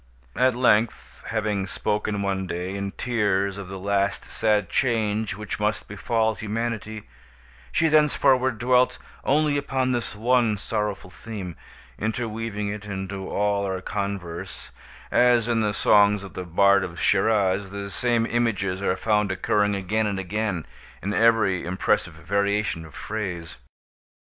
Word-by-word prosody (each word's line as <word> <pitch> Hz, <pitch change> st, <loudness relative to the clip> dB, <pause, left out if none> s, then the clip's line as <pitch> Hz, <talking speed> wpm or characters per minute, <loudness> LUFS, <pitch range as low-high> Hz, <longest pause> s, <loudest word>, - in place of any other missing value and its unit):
At 130 Hz, -1 st, +3 dB
length, 115 Hz, -3 st, +1 dB
having 105 Hz, -3 st, -1 dB
spoken 105 Hz, +1 st, -1 dB
one 95 Hz, -1 st, -1 dB
day, 90 Hz, +2 st, -3 dB
in 100 Hz, 0 st, -3 dB
tears, 100 Hz, -5 st, 0 dB
of 100 Hz, -, -7 dB
the 95 Hz, +1 st, -6 dB
last 100 Hz, +1 st, -1 dB
sad 105 Hz, -3 st, +1 dB
change 110 Hz, -4 st, 0 dB
which 105 Hz, +1 st, -5 dB
must 105 Hz, 0 st, -1 dB
befall 110 Hz, +2 st, 0 dB
Humanity, 110 Hz, 0 st, -4 dB, 0.7 s
she 165 Hz, 0 st, +3 dB
thenceforward 135 Hz, -5 st, +3 dB
dwelt 125 Hz, +2 st, +3 dB, 0.3 s
only 145 Hz, +1 st, +2 dB
upon 130 Hz, -2 st, 0 dB
this 120 Hz, -3 st, -2 dB
one 115 Hz, -1 st, +2 dB
sorrowful 105 Hz, -3 st, -3 dB
theme, 100 Hz, -7 st, -7 dB, 0.4 s
interweaving 110 Hz, -1 st, -3 dB
it 105 Hz, 0 st, -4 dB
into 95 Hz, -1 st, -5 dB
all 100 Hz, 0 st, +1 dB
our 95 Hz, -1 st, -2 dB
converse, 95 Hz, -3 st, -5 dB, 0.4 s
as, 120 Hz, -2 st, +4 dB
in 115 Hz, -2 st, +1 dB
the 105 Hz, -1 st, +1 dB
songs 105 Hz, 0 st, +4 dB
of 100 Hz, -, -10 dB
the 90 Hz, -, -5 dB
bard 100 Hz, +3 st, +4 dB
of 85 Hz, -2 st, -6 dB
Schiraz, 100 Hz, -1 st, +2 dB
the 100 Hz, 0 st, -6 dB
same 120 Hz, -1 st, +1 dB
images 100 Hz, -6 st, 0 dB
are 95 Hz, -2 st, 0 dB
found 105 Hz, -2 st, +1 dB
occurring, 105 Hz, +2 st, +1 dB
again 105 Hz, +3 st, 0 dB
and 100 Hz, -2 st, -2 dB
again, 95 Hz, -2 st, -2 dB, 0.4 s
in 100 Hz, +2 st, -1 dB
every 110 Hz, -5 st, +3 dB
impressive 90 Hz, 0 st, 0 dB
variation 100 Hz, +1 st, -1 dB
of 80 Hz, -, -14 dB
phrase. 90 Hz, -6 st, -5 dB
105 Hz, 140 wpm, -25 LUFS, 95-115 Hz, 0.7 s, as